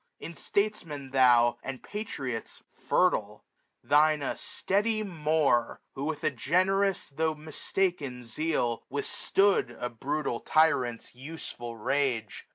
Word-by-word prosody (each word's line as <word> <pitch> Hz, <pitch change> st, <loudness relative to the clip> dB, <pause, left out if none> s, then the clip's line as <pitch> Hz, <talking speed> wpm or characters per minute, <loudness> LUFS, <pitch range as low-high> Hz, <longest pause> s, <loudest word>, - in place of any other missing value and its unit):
In 165 Hz, -, -7 dB
Statesmen 165 Hz, -9 st, -2 dB
thou. 120 Hz, -3 st, +5 dB
And 135 Hz, -1 st, -6 dB
Patriots, 135 Hz, -, -5 dB
fertile. -, -, +1 dB, 0.4 s
Thine 150 Hz, 0 st, +4 dB
a -, -, -1 dB
steady 215 Hz, +3 st, -1 dB
More, 155 Hz, -, +1 dB
Who, 135 Hz, -, -4 dB
with 155 Hz, -1 st, -3 dB
a -, -, +2 dB
generous 185 Hz, +8 st, +1 dB
tho* 155 Hz, +2 st, -1 dB
mistaken 150 Hz, -3 st, -2 dB
zeal. 120 Hz, -2 st, -1 dB
Withstood 145 Hz, -, +1 dB
a 125 Hz, 0 st, -3 dB
brutal 135 Hz, +1 st, -2 dB
tyrant's 130 Hz, -7 st, +2 dB
useful 125 Hz, -4 st, -8 dB
rage. 120 Hz, -2 st, -1 dB
145 Hz, 110 wpm, -29 LUFS, 125-165 Hz, 0.4 s, thou